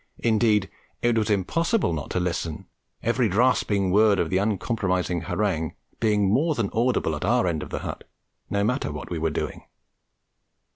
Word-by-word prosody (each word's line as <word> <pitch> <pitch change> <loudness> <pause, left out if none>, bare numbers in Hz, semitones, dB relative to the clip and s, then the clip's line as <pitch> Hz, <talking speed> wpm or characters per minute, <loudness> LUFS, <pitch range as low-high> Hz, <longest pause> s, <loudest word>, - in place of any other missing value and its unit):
Indeed, 110 -3 +3 0.4
it 120 -1 +3
was 110 -1 +1
impossible 165 - +1
not 75 -3 -4
to - - -1
listen, 85 -3 -3 0.4
every 115 0 +2
rasping 100 -3 +2
word 105 +1 +5
of - - 0
the 95 - +2
uncompromising 95 -4 0
harangue 90 -7 -1 0.2
being 105 -3 +2
more 145 - +2
than 110 -6 -1
audible 115 -8 +1
at 75 - -5
our 120 +2 +2
end 80 -4 -1
of - - -7
the - - -4
hut, - - -6 0.4
no 100 0 0
matter 125 - 0
what 75 +3 -7
we 85 - -2
were 80 +1 +1
doing. 75 - -4
105 Hz, 165 wpm, -25 LUFS, 90-115 Hz, 0.4 s, word